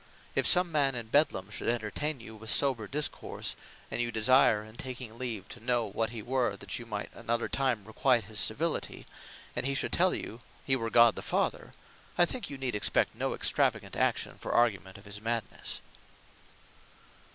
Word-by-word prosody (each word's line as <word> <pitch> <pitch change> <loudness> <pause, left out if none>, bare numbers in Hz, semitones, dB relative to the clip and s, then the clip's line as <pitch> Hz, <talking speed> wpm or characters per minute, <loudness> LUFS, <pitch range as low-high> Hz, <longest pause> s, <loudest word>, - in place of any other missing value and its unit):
If - - +2
some 180 -1 +5
man 140 -4 +2
in 115 -2 -4
Bedlam 110 -9 +2
should - - -5
entertaine 120 +6 -1
you 110 -1 -11
with 110 +1 -8
sober 120 -4 +3
discourse; 150 +5 -2 0.4
and - - 0
you 120 0 -1
desire 110 -1 +4
in 110 +1 -14
taking 125 -2 -6
leave, 115 -6 -4
to 120 - -10
know 120 -1 +1
what 110 +2 -2
he 110 -2 -7
were, 125 +1 0
that - - -4
you 120 - -9
might 105 -2 -5
another 115 0 -2
time 130 -7 0
requite 120 +2 +2
his 105 +2 -6
civility; 160 +9 -1 0.5
and - - -1
he 135 +1 0
should - - +1
tell 185 +1 +3
you, 115 +2 -6 0.2
he 135 - +3
were 115 -3 -2
God 115 0 +6
the - - -6
Father; - - -2 0.4
I 175 - +7
think 245 +7 -3
you 140 - -6
need 130 -2 -2
expect 105 - +2
no - - -2
extravagant - - +2
action - - 0
for - - -4
argument 100 -5 +1
of 100 - -15
his 100 0 -5
Madnesse. 115 -1 -2
120 Hz, 185 wpm, -30 LUFS, 110-135 Hz, 0.5 s, I